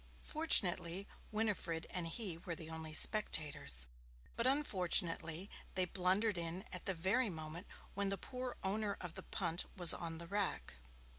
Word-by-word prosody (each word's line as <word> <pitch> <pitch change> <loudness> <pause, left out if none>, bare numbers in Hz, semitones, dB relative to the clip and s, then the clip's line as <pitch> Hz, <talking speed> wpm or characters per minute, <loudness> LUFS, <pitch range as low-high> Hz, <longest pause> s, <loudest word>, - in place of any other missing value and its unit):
Fortunately, 195 - +3 0.2
Winifred 205 -7 -2
and 180 -2 -3
he 175 -1 -4
were 170 -1 -6
the 160 0 -9
only 160 -1 -6
spectators; 150 - +3 0.5
but 235 - 0
unfortunately 180 - +2 0.3
they 185 0 +1
blundered 185 +3 0
in 170 +3 -3
at 180 - -7
the 190 - -1
very 205 +8 0
moment 160 +2 -8 0.3
when 200 0 -1
the 195 - -2
poor 250 +5 -7
owner 200 +1 -2
of 175 -2 -8
the 190 - -8
punt 175 -2 -2
was 175 -2 +9
on 165 -1 -6
the 170 - -7
rack. 200 +1 -2
180 Hz, 150 wpm, -36 LUFS, 165-205 Hz, 0.5 s, was